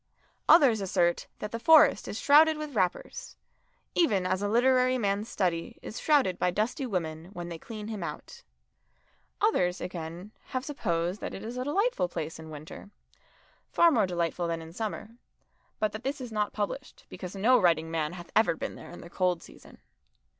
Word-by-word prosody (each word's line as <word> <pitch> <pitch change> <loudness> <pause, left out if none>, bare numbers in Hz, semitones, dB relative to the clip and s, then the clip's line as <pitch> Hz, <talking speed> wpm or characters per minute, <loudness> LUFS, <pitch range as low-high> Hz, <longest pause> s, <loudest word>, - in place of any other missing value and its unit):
Others 265 - +6
assert 180 -3 +1
that 210 - -6
the 230 - -4
Forest 315 +5 +6
is 210 - -4
shrouded 310 +2 +6
with 305 -2 -6
wrappers, 185 -6 -2 0.6
even 210 - +2
as 185 +1 0
a 205 - 0
literary 255 +3 +3
man's 205 0 -1
study 180 +4 -2
is 225 - -6
shrouded 275 - +2
by 180 - +2
dusty 225 - -1
women 165 -6 -3
when 175 -2 -6
they 165 -1 -7
clean 215 +1 -8
him 215 -3 -5
out. 150 -3 -7 1.0
Others, 180 0 +2
again, 175 +2 -6
have 255 0 -4
supposed 180 - -2
that - - -5
it 195 - -8
is 230 +3 -6
a 250 - -2
delightful 390 - +1
place 165 -2 -5
in 160 0 -10
winter, 155 +6 -10 0.8
far 340 -1 +5
more 220 -9 +3
delightful 175 -1 -1
than 165 0 -2
in 165 0 -10
summer, 220 +2 -5 0.6
but 215 -1 0
that 215 +3 -7
this 280 +2 -2
is 250 -3 -7
not 210 -1 -1
published, 215 +6 -5
because 185 0 -8
no 235 +5 +4
writing 165 -2 +2
man 160 0 -1
hath 175 -1 -10
ever 220 -6 +4
been - - -5
there - - -11
in 175 - -10
the - - -10
cold 180 -2 0
season. - - -15
205 Hz, 180 wpm, -28 LUFS, 175-250 Hz, 1.0 s, Others